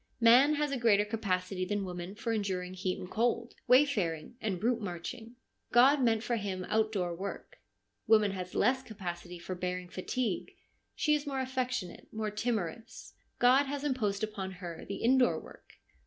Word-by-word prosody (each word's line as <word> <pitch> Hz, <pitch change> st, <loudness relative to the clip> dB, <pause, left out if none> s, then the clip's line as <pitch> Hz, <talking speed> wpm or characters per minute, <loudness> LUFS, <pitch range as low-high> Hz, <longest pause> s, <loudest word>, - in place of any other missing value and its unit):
Man 250 Hz, +6 st, +6 dB
has 295 Hz, -1 st, 0 dB
a 275 Hz, -, -1 dB
greater 210 Hz, -3 st, +4 dB
capacity 190 Hz, -4 st, -2 dB
than 200 Hz, +1 st, -1 dB
woman 180 Hz, +1 st, -6 dB
for 230 Hz, +1 st, -2 dB
enduring 185 Hz, -4 st, -2 dB
heat 185 Hz, 0 st, -2 dB
and 180 Hz, -, -7 dB
cold, 235 Hz, +3 st, 0 dB
wayfaring 240 Hz, -, +3 dB
and 190 Hz, -4 st, -2 dB
route 235 Hz, 0 st, +2 dB
marching. 205 Hz, +5 st, -6 dB, 0.4 s
God 265 Hz, +4 st, +6 dB
meant 225 Hz, -3 st, +2 dB
for 240 Hz, -1 st, 0 dB
him 190 Hz, -3 st, -3 dB
outdoor 215 Hz, -5 st, +1 dB
work. 195 Hz, +3 st, -7 dB, 0.5 s
Woman 215 Hz, -2 st, +5 dB
has 180 Hz, -1 st, -6 dB
less 260 Hz, +4 st, +3 dB
capacity 180 Hz, -6 st, -7 dB
for 175 Hz, +2 st, -6 dB
bearing 180 Hz, 0 st, -4 dB
fatigue; 205 Hz, +3 st, -2 dB, 0.4 s
she 300 Hz, -, +2 dB
is 295 Hz, 0 st, 0 dB
more 270 Hz, -2 st, -2 dB
affectionate, 255 Hz, -6 st, -3 dB
more 215 Hz, -1 st, -3 dB
timorous. 220 Hz, -2 st, -3 dB, 0.2 s
God 255 Hz, +3 st, +5 dB
has 280 Hz, 0 st, -3 dB
imposed 220 Hz, -8 st, -1 dB
upon 200 Hz, -3 st, -3 dB
her 175 Hz, -2 st, -8 dB
the 200 Hz, -, -3 dB
indoor 255 Hz, +1 st, +4 dB
work. -, -, -15 dB
215 Hz, 160 wpm, -31 LUFS, 185-245 Hz, 0.5 s, Man